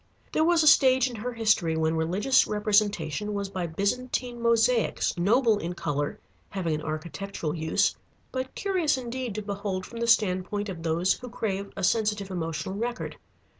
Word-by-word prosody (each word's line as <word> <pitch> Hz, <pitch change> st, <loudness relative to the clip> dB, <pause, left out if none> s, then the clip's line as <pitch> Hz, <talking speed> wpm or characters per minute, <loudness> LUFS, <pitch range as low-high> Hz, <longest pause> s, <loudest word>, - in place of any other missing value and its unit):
There 315 Hz, -, +2 dB
was 335 Hz, 0 st, +4 dB
a -, -, +3 dB
stage 260 Hz, -4 st, +6 dB
in 245 Hz, -, -6 dB
her 245 Hz, +4 st, -4 dB
history 215 Hz, -8 st, +2 dB
when 160 Hz, 0 st, +1 dB
religious 185 Hz, +11 st, +2 dB
representation 210 Hz, -3 st, +1 dB
was 200 Hz, -1 st, -3 dB
by 185 Hz, -3 st, -3 dB
Byzantine 240 Hz, +7 st, -2 dB
mosaics, 235 Hz, 0 st, +2 dB
noble 215 Hz, +5 st, +3 dB
in 175 Hz, -1 st, -4 dB
color, 145 Hz, -4 st, -2 dB, 0.3 s
having 180 Hz, -5 st, -2 dB
an 150 Hz, -, -2 dB
architectural 155 Hz, +2 st, -4 dB
use, 160 Hz, +5 st, +1 dB, 0.4 s
but 260 Hz, 0 st, -4 dB
curious 360 Hz, -8 st, +1 dB
indeed 250 Hz, -3 st, -4 dB
to 215 Hz, -, -3 dB
behold 200 Hz, -2 st, -3 dB
from 235 Hz, -, -9 dB
the 235 Hz, -, -1 dB
standpoint 205 Hz, -1 st, +1 dB
of 175 Hz, -3 st, -6 dB
those 165 Hz, +3 st, +2 dB
who 250 Hz, -, -9 dB
crave 200 Hz, -4 st, -3 dB
a -, -, -4 dB
sensitive 210 Hz, -1 st, +1 dB
emotional 165 Hz, 0 st, -3 dB
record. 235 Hz, +4 st, -4 dB
205 Hz, 165 wpm, -27 LUFS, 175-235 Hz, 0.4 s, stage